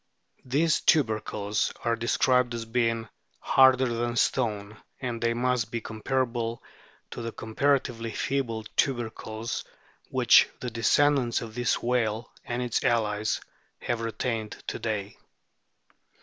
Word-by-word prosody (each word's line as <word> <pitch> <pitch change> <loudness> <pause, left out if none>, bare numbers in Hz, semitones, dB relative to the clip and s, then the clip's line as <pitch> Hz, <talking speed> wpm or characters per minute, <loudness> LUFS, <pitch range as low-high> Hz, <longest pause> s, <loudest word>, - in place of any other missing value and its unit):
These 155 +5 +2
tubercles 110 -6 +1
are 115 0 +2
described 125 +1 +2
as 115 -1 -4
being 115 -1 0 0.2
" - - -40
harder 130 -1 +5
than 120 0 -1
stone, 105 -4 0
" - - -44
and 120 -3 -4
they 115 0 +1
must 125 -2 0
be 115 - -2
comparable 115 +1 -2 0.5
to - - -6
the 115 0 -4
comparatively 115 0 0
feeble 120 -3 -2
tubercles 115 -3 -2 0.5
which - - +5
the 125 - -4
descendants 125 +2 +2
of 110 -2 -8
this 120 0 0
whale 115 -2 0
and 120 +1 -3
its 120 -2 -1
allies 110 -3 +1 0.4
have 120 -1 -2
retained 115 -1 -2 0.2
to - - -5
day. 105 -3 -3
115 Hz, 125 wpm, -27 LUFS, 110-125 Hz, 0.5 s, harder